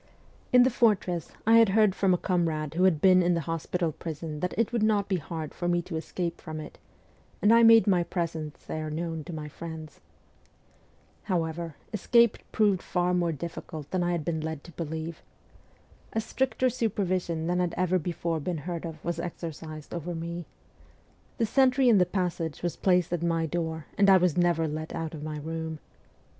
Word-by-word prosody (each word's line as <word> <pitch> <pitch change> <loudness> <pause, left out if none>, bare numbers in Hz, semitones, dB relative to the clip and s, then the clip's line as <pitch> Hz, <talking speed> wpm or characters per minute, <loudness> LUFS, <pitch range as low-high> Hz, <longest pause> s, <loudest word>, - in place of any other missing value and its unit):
In 250 0 +7
the 255 - +3
fortress 195 -8 +1
I 225 +1 +6
had 225 -3 +6
heard 215 -3 +5
from 195 0 +2
a 180 - +4
comrade 165 -5 -1
who 180 +3 +3
had 165 -5 +3
been 185 -1 +6
in 175 0 +2
the 165 - 0
hospital 165 +2 -2
prison 155 0 -6
that 180 +3 -2
it 230 +1 +1
would 235 - +1
not 210 -2 +2
be 190 - +1
hard 160 -2 -6
for 175 - -3
me 175 0 +1
to 170 - -6
escape 170 +1 -4
from 155 -2 -6
it, 155 - -9 0.6
and 210 +2 +5
I 230 - +7
made 225 -1 +8
my 185 -4 +3
presence 165 -4 -4
there 155 0 -4
known 165 0 -3
to - - -7
my 155 -2 -5
friends. 160 0 -8 1.3
However, 165 -4 -2 0.2
escape 235 +2 +4
proved 205 -4 +2
far 180 0 0
more 175 -2 +1
difficult 160 -1 -7
than 185 - 0
I 175 0 +1
had 165 -4 -2
been 160 -2 -1
led 160 -2 -4
to 175 - -12
believe. 160 0 -5 0.9
A 225 - +1
stricter 260 +3 0
supervision 185 -8 -1
than 180 +1 0
had 180 -2 0
ever 185 +1 +2
before 170 0 -2
been 170 +3 -3
heard 170 -1 -3
of 160 -1 -10
was 170 -1 -2
exercised 160 -3 -6
over 175 +1 -4
me. 170 +1 -5 0.9
The 230 - +2
sentry 260 +2 +4
in 215 -4 +6
the 180 - +3
passage 175 -4 -2
was 175 - -1
placed 180 -2 +2
at 175 - -1
my 165 -1 +1
door, 160 -1 -3
and 200 -1 +6
I 190 - +8
was 180 -3 +2
never 175 -2 +2
let 155 +1 -5
out 165 -1 -4
of 155 - -7
my 155 0 -4
room. 160 +1 -4
170 Hz, 190 wpm, -28 LUFS, 160-185 Hz, 1.3 s, made